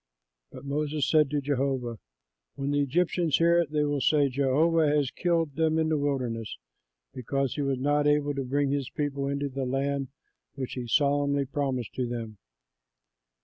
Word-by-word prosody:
But 130 Hz, -, -11 dB
Moses 150 Hz, +1 st, -1 dB
said 155 Hz, -3 st, +4 dB
to 145 Hz, 0 st, -1 dB
Jehovah, 135 Hz, -4 st, -1 dB, 0.6 s
"When 140 Hz, 0 st, -2 dB
the 145 Hz, 0 st, +2 dB
Egyptians 165 Hz, +2 st, +1 dB
hear 170 Hz, +1 st, +4 dB
it, 170 Hz, -4 st, 0 dB
they 150 Hz, 0 st, +1 dB
will 145 Hz, -1 st, 0 dB
say, 145 Hz, 0 st, +3 dB
'Jehovah 150 Hz, +5 st, +2 dB
has 145 Hz, -3 st, +1 dB
killed 165 Hz, -4 st, 0 dB
them 160 Hz, 0 st, +1 dB
in 160 Hz, 0 st, +1 dB
the 155 Hz, -, +1 dB
wilderness 125 Hz, -6 st, -2 dB, 0.6 s
because 135 Hz, +1 st, -2 dB
he 145 Hz, -, -3 dB
was 135 Hz, -2 st, 0 dB
not 145 Hz, +2 st, +1 dB
able 145 Hz, 0 st, +2 dB
to 140 Hz, -1 st, -3 dB
bring 140 Hz, +2 st, 0 dB
this 140 Hz, -2 st, -1 dB
people 140 Hz, -2 st, -2 dB
into 140 Hz, +1 st, -1 dB
the 135 Hz, 0 st, -4 dB
land 135 Hz, +1 st, -1 dB, 0.5 s
which 130 Hz, -2 st, -5 dB
he 125 Hz, -2 st, -5 dB
solemnly 140 Hz, +1 st, +2 dB
promised 130 Hz, -4 st, -2 dB
to 125 Hz, -1 st, -2 dB
them.' 115 Hz, -4 st, -6 dB
140 Hz, 170 wpm, -27 LUFS, 135-150 Hz, 0.6 s, said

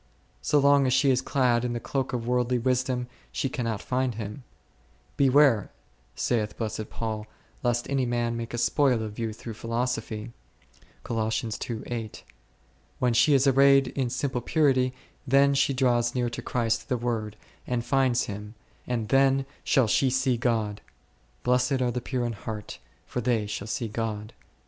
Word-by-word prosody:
So 75 Hz, -, +2 dB
long 140 Hz, -1 st, +5 dB
as 125 Hz, -, +2 dB
she 135 Hz, +1 st, +4 dB
is 130 Hz, 0 st, +2 dB
clad 125 Hz, -3 st, +2 dB
in 120 Hz, -1 st, -1 dB
the 120 Hz, -, -2 dB
cloak 135 Hz, +2 st, -2 dB
of 120 Hz, -2 st, -3 dB
worldly 125 Hz, 0 st, +1 dB
wisdom, 125 Hz, 0 st, 0 dB, 0.3 s
she 135 Hz, -, -1 dB
cannot 115 Hz, -5 st, -3 dB
find 125 Hz, -2 st, -1 dB
Him; 110 Hz, +4 st, -6 dB, 0.7 s
Beware, 135 Hz, -5 st, +4 dB, 0.5 s
saith 110 Hz, -3 st, -1 dB
blessed 110 Hz, -1 st, -4 dB
Paul, 110 Hz, -2 st, -4 dB, 0.3 s
lest 120 Hz, -1 st, 0 dB
any 135 Hz, -2 st, 0 dB
man 120 Hz, -1 st, 0 dB
make 115 Hz, 0 st, -5 dB
a 120 Hz, -, -3 dB
spoil 125 Hz, -1 st, +2 dB
of 105 Hz, 0 st, -7 dB
you 115 Hz, -1 st, -1 dB
through 115 Hz, +1 st, -8 dB
philosophy 115 Hz, -1 st, -3 dB, 0.7 s
1: 110 Hz, -1 st, -1 dB, 1.7 s
when 125 Hz, -2 st, +1 dB
she 130 Hz, +5 st, +5 dB
is 135 Hz, 0 st, +4 dB
arrayed 135 Hz, 0 st, +5 dB
in 130 Hz, -3 st, -2 dB
simple 130 Hz, 0 st, -2 dB
purity, 130 Hz, -2 st, +2 dB, 0.4 s
then 140 Hz, +2 st, +5 dB
she 140 Hz, 0 st, +2 dB
draws 125 Hz, -3 st, +1 dB
near 120 Hz, -1 st, 0 dB
to -, -, -5 dB
Christ 115 Hz, -2 st, -1 dB
the 125 Hz, -, +1 dB
Word 115 Hz, -3 st, -2 dB, 0.3 s
and 120 Hz, -1 st, -1 dB
finds 130 Hz, -2 st, +2 dB
Him, 105 Hz, +2 st, -7 dB, 0.3 s
and 115 Hz, -3 st, -1 dB
then 135 Hz, 0 st, +4 dB, 0.2 s
shall 135 Hz, -, +3 dB
she 130 Hz, +5 st, +2 dB
see 130 Hz, 0 st, +1 dB
God; 115 Hz, -4 st, -1 dB, 0.6 s
Blessed 125 Hz, +2 st, +2 dB
are 125 Hz, -1 st, +1 dB
the 125 Hz, -, -3 dB
pure 125 Hz, 0 st, -2 dB
in 120 Hz, -, -2 dB
heart, 105 Hz, 0 st, -7 dB, 0.3 s
for 125 Hz, -, -3 dB
they 115 Hz, -3 st, +1 dB
shall 105 Hz, 0 st, -5 dB
see 115 Hz, +1 st, -2 dB
God 110 Hz, -1 st, -3 dB
k. -, -, -32 dB
120 Hz, 165 wpm, -27 LUFS, 115-130 Hz, 1.7 s, long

